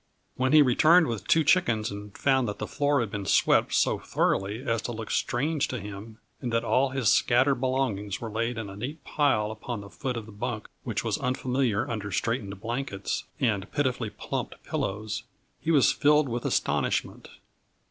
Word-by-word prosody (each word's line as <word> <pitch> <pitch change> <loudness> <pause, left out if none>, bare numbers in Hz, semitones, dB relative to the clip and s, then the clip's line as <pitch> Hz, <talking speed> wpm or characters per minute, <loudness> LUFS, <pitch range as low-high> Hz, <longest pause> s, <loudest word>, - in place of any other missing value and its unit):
When 130 +1 +1
he 155 -1 +8
returned 160 +7 +5
with 110 -7 -4
two 160 - +4
chickens 140 - +2
and 100 0 -8
found 130 -3 +2
that 105 0 -4
the - - -3
floor 145 -2 +1
had 110 -4 -3
been 100 -3 -4
swept - - +3
so - - +2
thoroughly 100 +5 -1
as 115 -4 0
to 120 - -4
look 115 -1 -6
strange 145 +4 0
to 125 - -4
him, 105 +2 -9 0.2
and 120 - -3
that 115 0 +1
all 135 +1 +2
his 130 -3 -1
scattered 130 +2 +3
belongings 125 -7 -1
were 115 -2 -6
laid 115 +2 -1
in 110 -2 -4
a 100 - -9
neat 135 +8 -6
pile 120 -8 +1
upon 110 0 -5
the 100 - -11
foot 125 -2 -3
of 115 - -5
the 110 - -12
bunk 110 +1 -4
which - - -2
was - - -1
unfamiliar 125 -3 0
under 105 -4 -4
straightened 105 -4 -2
blankets 115 -3 -3
and 100 -5 0
pitifully 130 -6 0
plumped - - -5
pillows, 105 +2 -3 0.4
he - - -4
was 145 -5 +5
filled 150 0 +3
with 120 -1 -3
astonishment. - - -1
120 Hz, 185 wpm, -27 LUFS, 105-135 Hz, 0.4 s, he